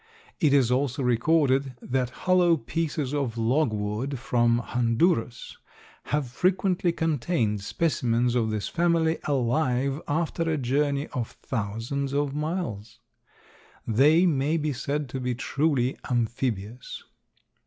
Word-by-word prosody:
It 150 - +3
is 135 -4 +4
also 135 +1 0
recorded 135 +1 +2
that 125 0 -1 0.2
hollow 180 -2 +4
pieces 145 +2 -3
of 135 -6 -2
logwood 115 0 0
from 120 -1 +2
Honduras 120 +2 0 0.5
have 150 -3 -1
frequently 180 +3 +1
contained 140 - 0
specimens 120 -2 0
of 115 -3 +1
this 105 -2 -2
family 165 -1 +1
alive 135 +1 0
after 160 +3 -1
a 160 - 0
journey 140 +2 0
of 120 -3 -4
thousands 120 +5 -3
of 145 -1 0
miles. 150 - -4 0.9
They 150 +10 +4
may 150 -1 +1
be 150 -2 -1
said 145 +3 -2
to 130 - -4
be 125 -1 -2
truly 135 0 0
amphibious. 120 -2 -2
135 Hz, 115 wpm, -26 LUFS, 120-155 Hz, 0.9 s, is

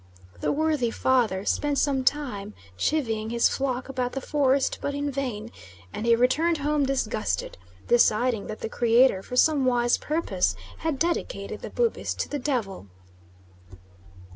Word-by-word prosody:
The - - 0
worthy 300 -5 +1
Father 225 -6 +1
spent 290 -1 0
some 270 -1 +1
time 250 -8 -1 0.2
chivying 225 - -1
his 235 0 +3
flock 260 -2 -2
about 255 -2 -3
the 270 - -2
forest, 275 -1 +1
but 285 - -2
in 285 0 -2
vain, 240 -5 -4 0.4
and 225 - -4
he 235 - +6
returned 295 +8 +2
home 290 -1 0
disgusted, 215 - -1 0.3
deciding 240 -2 +3
that 215 - -7
the - - -2
Creator, 235 -2 +3
for 250 - -7
some 290 +1 +4
wise 240 -1 +2
purpose, 290 - 0 0.2
had 320 -3 -1
dedicated 340 - -2
the - - -6
Bubis 475 -2 -1
to - - -3
the 290 - -3
Devil. 230 - -3
255 Hz, 145 wpm, -26 LUFS, 230-290 Hz, 0.4 s, he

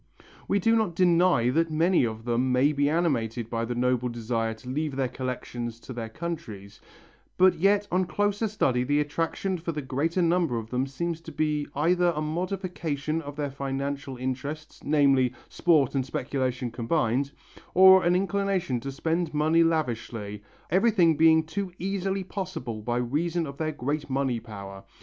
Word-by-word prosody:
We 200 - +2
do 225 +4 +3
not 215 -7 0
deny 175 -8 +4
that 165 +4 +1
many 165 -1 +3
of 110 0 -7
them 125 +2 +1
may 130 +4 +4
be 145 0 +2
animated 120 -9 0
by 115 0 -1
the 120 +1 -3
noble 125 0 +1
desire 115 -1 -2
to 110 +3 -15
leave 145 +2 -2
their 135 -1 0
collections 120 -2 -5
to 130 - -8
their 115 -2 -5
countries, 110 - -7 0.6
but 185 0 +6
yet 200 +3 +3
on 185 +1 +2
closer 205 +4 0
study 130 -12 +1
the 145 +3 +1
attraction 165 +5 -1
for 165 0 -4
the 150 -1 -4
greater 160 +7 0
number 170 -6 +2
of 115 0 -6
them 130 +2 0
seems 165 +4 -3
to 165 - -9
be 150 -1 -1
either 175 +4 +2
a - - -2
modification 165 -2 -2
of 145 -2 -8
their 145 -2 -3
financial 140 0 -4
interests, 135 +5 -5
namely, 135 -4 +3
sport 155 -7 +2
and 135 -2 +1
speculation 130 -2 -2
combined, 125 +2 0 0.5
or 190 0 +8
an 175 +1 +3
inclination 195 -8 0
to 135 +3 -5
spend 160 +3 -1
money 160 +3 +4
lavishly, 115 -10 -2 0.3
everything 185 -4 +4
being 160 +1 +5
too 185 +4 -4
easily 195 +1 -2
possible 175 - -5
by 120 +2 -1
reason 160 +8 -1
of 140 -1 -8
their 155 -1 0
great 145 +1 -3
money 135 -3 0
power. 100 -3 -9
145 Hz, 165 wpm, -27 LUFS, 125-170 Hz, 0.6 s, or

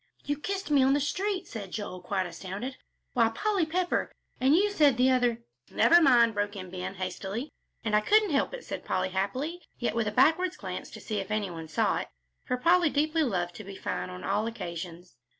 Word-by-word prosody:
"You 290 - 0
kissed 390 -2 -3
me 285 -2 +5
on 265 +1 +4
the 290 - +3
street!" 375 +6 -1
said 205 -4 -7
Joel, 200 -4 -5
quite 185 +1 -1
astounded. 190 +9 -6 0.4
"Why, 230 -2 +4
Polly 390 - 0
Pepper, 355 +2 0 0.3
and 265 +4 +4
you 410 +4 +3
said 295 - +4
the 255 +1 +4
other 245 -2 +1
" 125 - -57
"Never 345 +1 +5
mind," 240 -6 +5
broke 205 0 -1
in 185 -2 -7
Ben, 185 +1 -5
hastily. 195 +7 -4 0.3
"And 215 -2 +1
I 210 - +4
couldn't 420 - +4
help 275 - +1
it," - - -10
said - - -5
Polly, - - -1
happily, 255 - -2 0.2
yet 240 - -1
with 230 -1 0
a - - 0
backward 325 +9 +3
glance - - -6
to - - -10
see 215 -2 -3
if 195 - -5
any 210 -3 -1
one 165 -1 -7
saw 155 - +1
it, - - -5 0.4
for 250 - -1
Polly 340 +4 +4
deeply 310 +3 +1
loved 180 - 0
to 215 - -8
be 195 0 -9
fine 90 - -3
on 90 0 -8
all 215 - 0
occasions. 175 - -7
235 Hz, 215 wpm, -28 LUFS, 190-310 Hz, 0.4 s, me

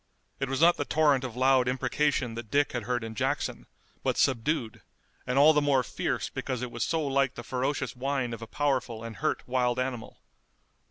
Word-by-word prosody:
It 135 -1 -2
was 135 - -1
not 175 +1 +6
the - - 0
torrent 145 -3 +2
of 125 -3 -5
loud 130 0 +3
imprecation 130 -1 0
that 115 -1 -7
Dick 145 +3 +2
had 120 -4 -4
heard 120 0 -1
in 115 0 -6
Jackson, 110 - -2 0.3
but - - 0
subdued, 125 -1 0 0.5
and 125 +1 0
all 150 +3 +7
the 150 - +3
more 140 -3 +3
fierce - - -2
because 130 -2 -4
it 125 - -4
was 120 - -2
so 160 -2 0
like 135 -1 +1
the 120 - -7
ferocious 130 +2 -2
whine 130 -1 -1
of 115 - -7
a 115 - -7
powerful 130 -6 -1
and 115 -3 -7
hurt - - -1
wild 125 -1 +1
animal. 125 -3 -4
130 Hz, 200 wpm, -28 LUFS, 120-140 Hz, 0.5 s, all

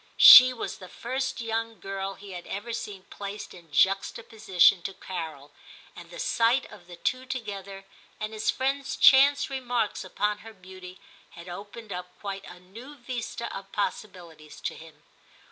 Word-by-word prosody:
She 255 0 +11
was 250 - -6
the 185 - -11
first 260 +4 -4
young 225 -1 -3
girl 195 +1 -5
he 195 0 -12
had 175 -1 -8
ever 220 +4 -5
seen 200 -4 -6
placed 200 +1 -7
in 170 -4 -16
juxtaposition 195 +3 +3
to 195 +2 -6
Carol, 160 -6 -7 0.4
and - - -12
the - - -11
sight 250 - +2
of 175 - -14
the 175 - -10
two 255 +8 -2
together, 200 -6 -6 0.3
and 215 +1 -4
his 215 0 -2
friend's 270 +1 -1
chance 280 +1 +6
remarks 245 -4 -2
upon 210 +2 -2
her 225 +1 -12
beauty, 185 -1 -12 0.4
had 170 +1 -11
opened 205 +4 -8
up 180 0 -8
quite 195 -1 -6
a 180 - -12
new 230 +11 -12
vista 240 -2 -6
of 195 0 -9
possibilities 175 -7 -5
to - - -3
him. 160 -2 -15
200 Hz, 160 wpm, -27 LUFS, 185-235 Hz, 0.4 s, She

